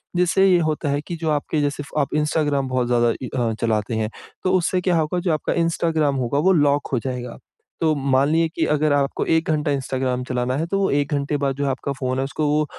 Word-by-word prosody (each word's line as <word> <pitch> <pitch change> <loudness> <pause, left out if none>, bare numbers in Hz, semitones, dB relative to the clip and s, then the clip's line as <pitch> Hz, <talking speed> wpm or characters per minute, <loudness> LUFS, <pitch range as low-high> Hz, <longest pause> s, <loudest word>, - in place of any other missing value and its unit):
जिससे 180 +2 +3
ये 180 - +5
होता 150 -1 -2
है 140 +1 0
कि 175 - -4
जो 160 - 0
आपके 150 +1 -1
जैसे 145 0 -1
फ़ 150 - -4
आप 140 - -3
इंस्टाग्राम 150 -3 0
बहुत 125 -1 0
ज़्यादा 120 -1 +2
इ - - -4
हाँ 115 -2 0
चलाते 110 0 0
हैं, 110 -1 -1 0.3
तो 185 - +1
उससे 180 +1 0
क्या 180 -2 +2
होगा, 160 +3 0
जो 175 -2 0
आपका 155 - -1
इंस्टाग्राम 160 -3 +1
होगा 130 +2 0
वो - - +5
लॉक 145 -3 +2
हो 125 - +2
जाएगा। 125 -2 -5 0.4
तो 160 -1 +3
मान 135 0 +2
लीजिए 165 +1 +2
कि - - +1
अगर 150 0 +2
आपको 140 -1 0
1 160 0 +1
घंटा 150 -1 0
इंस्टाग्राम 130 -2 -1
चलाना 125 0 -1
है, 160 - -1
तो 195 +2 0
1 145 +1 0
घंटे 145 +1 -1
बाद 140 -1 -1
जो 140 +1 -2
आपका 135 +1 -3
फ़ोन 130 0 -1
है 135 - +1
उसको 140 +3 -2
वो 150 +1 +2
145 Hz, 235 wpm, -22 LUFS, 130-155 Hz, 0.4 s, ये